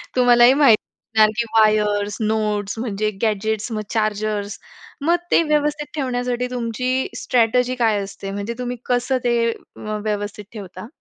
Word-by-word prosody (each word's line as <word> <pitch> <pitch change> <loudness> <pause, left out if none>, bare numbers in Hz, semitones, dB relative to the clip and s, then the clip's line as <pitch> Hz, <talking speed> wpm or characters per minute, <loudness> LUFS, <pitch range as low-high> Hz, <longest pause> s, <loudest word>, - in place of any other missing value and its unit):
तुम्हालाही 245 0 +6
माहीत 250 -7 +7
असणार 215 0 0
की 235 - +1
वायर्स, 210 -1 +2
नोट्स 210 -1 -1
म्हणजे 215 -3 -1
गॅजेट्स 220 +1 -1
मग 215 -1 -2
चार्जर्स. 215 -1 -1 0.5
मग 345 - +5 0.2
ते - - +5
व्यवस्थित 295 -1 0
ठेवण्यासाठी 250 -3 -1
तुमची 245 +1 -2 0.3
स्ट्रॅटेजी 250 +1 +2
काय 215 -3 +2
असते 195 0 -7
म्हणजे 205 +3 -4
तुम्ही 250 0 -3
कसं 250 +1 +1
ते 240 0 +2 0.7
व्यवस्थित 205 0 -3
ठेवता? 190 -1 -9
220 Hz, 130 wpm, -21 LUFS, 210-245 Hz, 0.7 s, माहीत